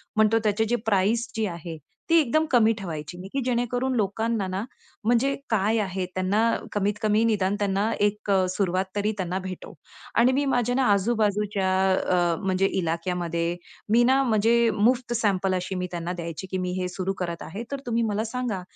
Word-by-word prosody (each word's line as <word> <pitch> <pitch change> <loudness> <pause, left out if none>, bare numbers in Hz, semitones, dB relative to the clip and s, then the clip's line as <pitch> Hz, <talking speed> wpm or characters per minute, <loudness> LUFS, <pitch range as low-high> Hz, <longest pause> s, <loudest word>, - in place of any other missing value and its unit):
म्हणतो, 220 +1 +4
त्याचे 215 +1 +1
जे 235 +2 +1
प्राईस 220 +3 +2
जी 220 - 0
आहे 170 -3 -6 0.3
ती 330 - +5
एकदम 305 +4 +2
कमी 225 -3 +5
ठेवायची, 165 -2 -6 0.2
की 275 - 0
जेणेकरून 245 +1 0
लोकांना 220 0 0 0.6
म्हणजे 245 +4 +2 0.2
काय 220 +1 +2
आहे? 190 -1 -2
त्यांना 185 +3 +1 0.3
कमीत-कमी 210 +2 +1
निदान 205 -3 +1
त्यांना 200 +1 +1
एक 205 0 0
अ, 190 -1 +3
सुरुवात 185 0 0
तरी 205 +1 +1
त्यांना 185 0 -2
भेटो 185 -1 -7 0.4
आणि 240 +2 +5
मी 280 +2 +1
माझ्या 245 -2 +1
ना 265 - +2
आजू-बाजूच्या 205 -2 +1 0.2
अ, 175 -2 +1
म्हणजे 190 0 +1 0.2
इलाक्यामध्ये 170 0 -2 0.4
मी 235 +2 +5
ना, 265 +2 +4
म्हणजे 230 0 +3
मुफ्त 240 +3 +2
सॅम्पल 195 -4 +1
अशी 185 +1 -3
मी 180 0 -2
त्यांना 175 0 -3
द्यायची, 170 +1 -6
"की 190 - -1
मी 180 -1 -2
हे 180 - -1
सुरू 185 +2 -3
करत 170 -1 -4
आहे, 200 +8 -6
तर 280 - -3
तुम्ही 235 -1 0
मला 215 -1 0
सांगा, 230 -4 -3
205 Hz, 170 wpm, -25 LUFS, 185-230 Hz, 0.6 s, ती